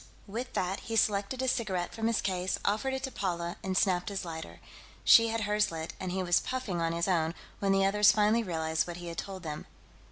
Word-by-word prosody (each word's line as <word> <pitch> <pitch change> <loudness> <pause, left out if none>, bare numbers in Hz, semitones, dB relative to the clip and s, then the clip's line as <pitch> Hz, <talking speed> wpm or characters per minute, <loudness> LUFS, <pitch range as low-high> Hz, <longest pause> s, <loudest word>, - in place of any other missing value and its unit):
With 235 +5 -5
that, 185 +2 -1
he 225 - -5
selected 210 +4 +1
a - - 0
cigarette 195 -8 -1
from 225 0 -1
his 230 -1 +1
case, 185 -1 -1
offered 220 +6 +1
it 265 - -5
to 265 - -3
Paula, 175 -5 -3
and 190 -1 -1
snapped 180 -1 +2
his 195 -2 -4
lighter. 160 -1 -7 0.4
She 230 0 +7
had 225 0 -1
hers 210 0 +2
lit, 160 0 -5
and 185 -1 -3
he 190 +1 -1
was 175 -1 +4
puffing 230 -10 -3
on 165 0 +1
his 170 +2 -1
own, 165 -3 +1 0.2
when 195 -1 +1
the 195 0 +4
others 210 +1 +6
finally 210 +3 +3
realized 160 -5 -1
what 175 0 -6
he 175 -1 -7
had 170 - -5
told 190 -2 -6
them. 150 -2 -6
195 Hz, 225 wpm, -30 LUFS, 175-215 Hz, 0.4 s, She